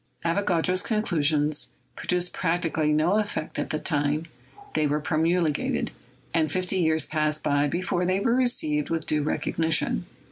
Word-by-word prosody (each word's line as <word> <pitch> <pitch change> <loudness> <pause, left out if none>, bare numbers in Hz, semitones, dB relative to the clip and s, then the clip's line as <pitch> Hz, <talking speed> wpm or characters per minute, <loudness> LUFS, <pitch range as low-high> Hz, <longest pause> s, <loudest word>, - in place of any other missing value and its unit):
Avogadro's 180 0 +1
conclusions 155 -8 +1 0.3
produced 180 0 -1
practically 165 -3 0
no 160 +7 +3
effect 205 -7 -3
at - - -2
the 155 - -1
time 150 0 0 0.5
they 155 -1 +2
were 150 +1 0
promulgated, 160 +1 0 0.4
and 155 -3 +1
fifty 185 +1 0
years 160 -3 +2
passed 155 -1 0
by 145 0 +2
before 175 +3 -1
they 185 +2 +1
were 230 +4 +1
received 155 - +1
with 165 -1 -2
due 155 -1 +1
recognition. 155 - 0
160 Hz, 140 wpm, -26 LUFS, 150-180 Hz, 0.5 s, no